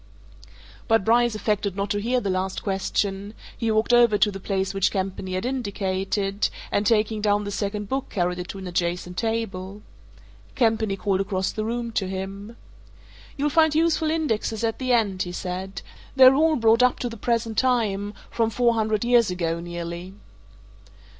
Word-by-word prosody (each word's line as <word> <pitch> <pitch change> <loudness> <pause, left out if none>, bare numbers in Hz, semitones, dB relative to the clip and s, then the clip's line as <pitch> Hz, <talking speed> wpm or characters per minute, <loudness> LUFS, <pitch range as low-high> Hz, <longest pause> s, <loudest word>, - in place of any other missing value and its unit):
But 225 -3 +3
Bryce 235 0 +3
affected 210 -2 -1
not 200 0 -2
to 205 - 0
hear 250 +4 +1
the 200 -5 -2
last 185 +1 -2
question; 195 +1 -2 0.2
he 230 - -2
walked 220 +2 +2
over 240 -3 +5
to 205 +1 +3
the 195 - -7
place 195 0 -2
which 195 -1 +2
Campany 190 -1 -3
had 185 +4 -2
indicated, 200 -4 -1 0.2
and 205 0 +1
taking 215 -1 +2
down 205 0 +2
the 205 - -4
second 205 0 -3
book 265 +4 -3
carried 180 -1 -1
it 180 - -5
to 195 - -7
an 190 - -7
adjacent 175 0 -2
table. 210 -3 -3 0.7
Campany 220 -4 +1
called 195 -1 0
across 190 -1 -1
the 215 - -3
room 235 +1 -3
to 200 -4 -1
him. 195 +4 -6 0.8
"You'll 290 +1 0
find 315 -1 +4
useful 320 -1 +2
indexes 235 -9 -1
at 225 -1 -1
the 255 -1 -1
end," 205 -6 +2
he 175 - -2
said. 185 +1 -5 0.3
"They're 260 -1 +8
all 315 +3 +3
brought 230 -1 +4
up 250 0 +4
to 245 - -3
the 230 - -6
present 230 -1 -1
time 210 -5 0 0.2
from 225 -1 +1
four 235 +1 +2
hundred 220 -1 0
years 240 -3 +4
ago, 170 -2 -2
nearly." 175 +2 -6
210 Hz, 175 wpm, -24 LUFS, 190-230 Hz, 0.8 s, They're